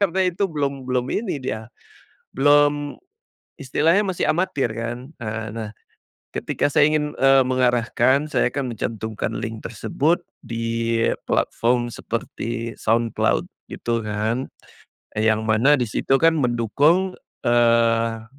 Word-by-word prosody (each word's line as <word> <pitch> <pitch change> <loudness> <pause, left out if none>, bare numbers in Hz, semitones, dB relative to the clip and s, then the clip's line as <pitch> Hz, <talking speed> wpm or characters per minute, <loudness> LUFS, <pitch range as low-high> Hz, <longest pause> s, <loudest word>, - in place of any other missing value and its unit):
Karena 190 -1 +2
itu 180 +3 0
belum 140 -3 -2
belum 125 0 0
ini 205 -9 -2
dia, 110 -3 -4 0.7
belum 145 +1 +3 0.7
istilahnya 160 +8 +2
masih 185 -2 -1
amatir 155 -8 0
kan? 120 +4 -5
Eee, 110 0 -4
nah. 110 -2 -5 0.6
Ketika - - -1
saya 145 +1 +4
ingin, 150 -1 0
eee, 135 0 +5
mengarahkan, 130 +2 +2
saya - - +2
akan 130 -2 -3
mencantumkan 110 0 -3
link 110 0 -5
tersebut 145 +8 0 0.3
di 115 0 -1 0.2
platform 120 0 +1
seperti 115 0 -4
SoundCloud, 115 0 +1 0.2
gitu 115 -1 -2
kan. 110 +5 -2 0.7
Yang 110 0 +2
mana 110 +6 +4
di 125 - 0
situ 135 +5 +1
kan 165 -1 +4
mendukung, 145 - +2 0.3
eee, 115 -1 +3
120 Hz, 115 wpm, -22 LUFS, 115-145 Hz, 0.7 s, eee